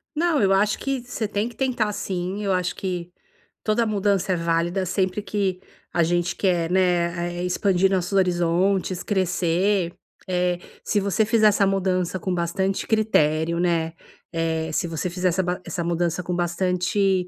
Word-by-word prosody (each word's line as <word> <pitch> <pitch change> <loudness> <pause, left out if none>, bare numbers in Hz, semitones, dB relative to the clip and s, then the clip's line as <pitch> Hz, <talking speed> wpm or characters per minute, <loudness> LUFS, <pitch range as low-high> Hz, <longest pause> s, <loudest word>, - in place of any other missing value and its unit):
Não, 325 -2 +2
eu 195 -1 +4
acho 205 +2 +2
que 275 -2 -2
você 240 -2 -4
tem 205 +1 -1
que 240 - -10
tentar 245 -5 0
sim, 190 0 -3
eu 200 - 0
acho 180 -1 0
que 180 -2 -4 0.5
toda 225 +2 +2
mudança 200 -3 +1
é - - +1
válida, 170 +2 0
sempre 185 +2 0
que 195 -2 -2 0.3
a 170 - +3
gente 175 +1 0
quer, 175 -3 +1
né, 175 -1 +1
eh, - - -1
expandir 190 +1 +2
nossos 185 0 0
horizontes, 185 0 +1
crescer. 185 -1 +1 0.3
Eh, 180 -1 0 0.2
se 210 - +1
você 200 +2 +1
fizer 220 0 +4
essa 200 -1 +3
mudança 185 -2 0
com 185 +1 -2
bastante 180 +3 -1
critério, 170 -7 +2
né. 165 -2 +1 0.4
Eh, 160 -1 -1
se 170 - 0
você 165 +2 -3
fizer 180 +1 0
essa 185 +2 0
ba 180 0 -2
essa 175 - -3
mudança 170 +1 -1
com 175 0 -2
bastante 180 +2 +1
185 Hz, 165 wpm, -23 LUFS, 175-200 Hz, 0.5 s, eu